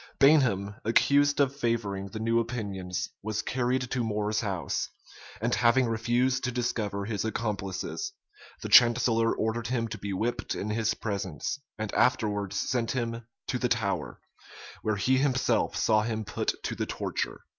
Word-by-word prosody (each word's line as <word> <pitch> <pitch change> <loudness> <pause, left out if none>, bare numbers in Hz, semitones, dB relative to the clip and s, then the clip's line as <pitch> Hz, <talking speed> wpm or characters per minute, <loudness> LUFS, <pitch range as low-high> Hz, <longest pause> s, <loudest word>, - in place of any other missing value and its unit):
Bainham, 115 -9 +4
accused 145 +6 +3
of 140 -1 +3
favoring 115 -7 -1
the 100 - -7
new 115 +1 +2
opinions, 100 -6 -3
was 110 +1 -2
carried 130 0 0
to 125 -2 0
More's 105 -1 0
house; 95 -5 -2 0.5
and 120 +2 0
having 125 +2 +4
refused 120 +3 +1
to 130 - 0
discover 110 -5 -2
his 105 -2 -2
accomplices, 105 - -3 0.5
the - - -2
chancellor 115 -1 +6
ordered 110 +1 -1
him 115 -1 0
to 105 -1 -6
be 100 0 -4
whipped 110 +6 -2
in 105 - -3
his 110 0 0
presence, 100 - -3 0.2
and 110 -1 -4
afterwards 105 -6 +1
sent 120 -3 0
him 115 -2 -3 0.2
to 125 - -2
the 125 - 0
Tower, 110 -5 -1 0.6
where 110 -1 0
he 130 +6 +2
himself 130 -2 +1
saw 110 -1 +3
him 110 0 -2
put - - -1
to - - -2
the - - -3
torture. - - -3
115 Hz, 155 wpm, -28 LUFS, 105-125 Hz, 0.6 s, chancellor